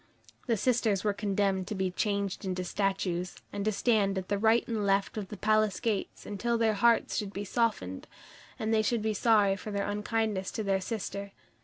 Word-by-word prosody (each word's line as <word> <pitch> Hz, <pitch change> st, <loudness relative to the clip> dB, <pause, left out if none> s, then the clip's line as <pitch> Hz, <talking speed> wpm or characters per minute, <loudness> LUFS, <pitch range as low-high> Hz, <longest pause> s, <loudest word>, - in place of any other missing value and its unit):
The 230 Hz, -2 st, +2 dB
sisters 225 Hz, -4 st, +1 dB
were 210 Hz, -1 st, +2 dB
condemned 195 Hz, -2 st, 0 dB
to 210 Hz, -, -3 dB
be 190 Hz, -1 st, -1 dB
changed 200 Hz, 0 st, -1 dB
into 185 Hz, -1 st, -2 dB
statues, 185 Hz, -1 st, -1 dB, 0.2 s
and 200 Hz, -, -2 dB
to 215 Hz, -, +2 dB
stand 205 Hz, -3 st, +2 dB
at 185 Hz, -1 st, -4 dB
the 205 Hz, 0 st, 0 dB
right 225 Hz, +2 st, +3 dB
and 225 Hz, -3 st, -1 dB
left 195 Hz, 0 st, +1 dB
of 210 Hz, -3 st, -4 dB
the 210 Hz, -, -8 dB
palace 215 Hz, -1 st, +2 dB
gates 215 Hz, -4 st, -2 dB
until 235 Hz, +3 st, -1 dB
their 225 Hz, -1 st, +3 dB
hearts 230 Hz, +3 st, +3 dB
should 205 Hz, -2 st, -3 dB
be 200 Hz, +1 st, -4 dB
softened, 200 Hz, -, -1 dB, 0.5 s
and 220 Hz, 0 st, -1 dB
they 220 Hz, -, +4 dB
should 215 Hz, 0 st, 0 dB
be 220 Hz, 0 st, +1 dB
sorry 205 Hz, -2 st, +4 dB
for 210 Hz, -, -7 dB
their 200 Hz, -1 st, -1 dB
unkindness 210 Hz, -1 st, -1 dB
to 220 Hz, -, -2 dB
their 195 Hz, -1 st, +1 dB
sister. 200 Hz, -1 st, -4 dB
205 Hz, 195 wpm, -30 LUFS, 195-220 Hz, 0.5 s, they